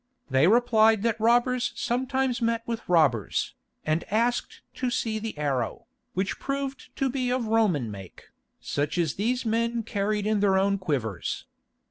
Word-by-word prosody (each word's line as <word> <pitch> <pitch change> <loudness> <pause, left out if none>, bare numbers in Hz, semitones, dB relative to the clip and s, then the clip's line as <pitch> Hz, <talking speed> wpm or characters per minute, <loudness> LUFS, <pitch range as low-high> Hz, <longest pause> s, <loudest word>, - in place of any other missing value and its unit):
They 135 +5 +4
replied 220 -1 +4
that 230 -1 0
robbers 245 +2 +2
sometimes 260 0 -1
met 230 0 0
with 230 -4 -5
robbers, 145 - +2 0.3
and 155 +2 +1
asked 235 +3 0
to 255 - -2
see 225 -2 -1
the 220 -5 -5
arrow, 135 -6 -2 0.3
which 190 +1 -1
proved 275 -1 -4
to 270 - 0
be 255 -1 -1
of 250 -1 0
a - - -5
Roman 180 - +2
make, 95 -3 -11 0.3
such 145 +4 -2
as 165 -4 +1
these 245 +5 -1
men 230 +1 0
carried 205 0 -1
in 215 -1 +2
their 195 -1 +3
own 200 +1 +2
quivers. 130 - -2
220 Hz, 155 wpm, -26 LUFS, 175-240 Hz, 0.3 s, They